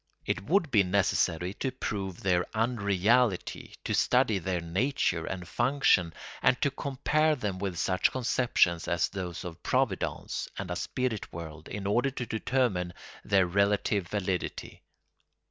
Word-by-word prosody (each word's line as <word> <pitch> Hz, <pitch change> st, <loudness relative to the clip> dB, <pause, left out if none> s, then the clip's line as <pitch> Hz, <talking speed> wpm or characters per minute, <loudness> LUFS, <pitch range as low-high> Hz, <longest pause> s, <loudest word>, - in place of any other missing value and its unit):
It -, -, -1 dB
would 170 Hz, -, +2 dB
be 105 Hz, -, +6 dB
necessary, 90 Hz, -2 st, +1 dB
to 130 Hz, -, -1 dB
prove 100 Hz, -7 st, -4 dB
their 90 Hz, -2 st, +3 dB
unreality, 110 Hz, -1 st, +1 dB
to -, -, -1 dB
study 125 Hz, -5 st, +3 dB
their 90 Hz, 0 st, -1 dB
nature 85 Hz, -, 0 dB
and 90 Hz, -2 st, -5 dB
function 120 Hz, -8 st, +2 dB, 0.3 s
and 130 Hz, 0 st, +3 dB
to 140 Hz, -, +2 dB
compare 150 Hz, +3 st, +1 dB
them 105 Hz, -8 st, -3 dB
with 95 Hz, -3 st, -3 dB
such 95 Hz, +2 st, +2 dB
conceptions 120 Hz, -9 st, +2 dB
as 85 Hz, 0 st, +1 dB
those 90 Hz, -3 st, -5 dB
of 85 Hz, -1 st, -8 dB
Providence 130 Hz, -6 st, -1 dB
and 95 Hz, -2 st, -4 dB
a -, -, -1 dB
spirit 120 Hz, +3 st, -2 dB
world 80 Hz, -2 st, -8 dB
in 105 Hz, -1 st, -5 dB
order 120 Hz, +7 st, +2 dB
to 125 Hz, -2 st, -5 dB
determine 110 Hz, -6 st, 0 dB, 0.3 s
their 95 Hz, -2 st, +3 dB
relative 100 Hz, +1 st, +1 dB
validity. 95 Hz, -2 st, -3 dB
100 Hz, 140 wpm, -29 LUFS, 90-125 Hz, 0.3 s, be